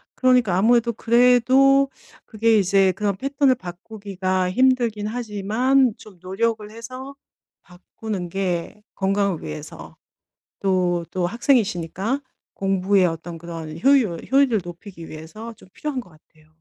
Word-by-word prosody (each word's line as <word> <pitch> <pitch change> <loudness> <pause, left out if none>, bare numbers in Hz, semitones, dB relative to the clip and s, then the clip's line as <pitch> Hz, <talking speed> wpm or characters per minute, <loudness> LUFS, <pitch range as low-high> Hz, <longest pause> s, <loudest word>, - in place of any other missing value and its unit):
그러니까 250 -7 +3
아무래도 235 +3 +3
그래도 250 +4 +4 0.4
그게 225 0 +2
이제 195 0 +3
그런 200 +1 -1
패턴을 275 +1 +2
바꾸기가 185 -1 -4
힘들긴 240 -3 +2
하지만 235 +3 +1
좀 200 -5 -15
노력을 210 +3 -2
해서 255 +5 -9 0.5
바꾸는 180 +1 -7
게 190 +2 -3
건강을 195 -2 0
위해서 75 -1 -9 0.7
또 180 -3 +1
또 180 -2 -1
학생이시니까 215 - 0 0.4
공부의 195 0 +2
어떤 165 +1 -6
그런 165 -1 -8
효유 265 -10 +4 0.2
효율을 265 -6 +3
높이기 175 -1 -10
위해서 190 +9 -9
좀 185 - -19
필요한 295 -4 -4
것 195 - -18
같아요. 155 -1 -24
205 Hz, 290 characters per minute, -22 LUFS, 180-240 Hz, 0.7 s, 그래도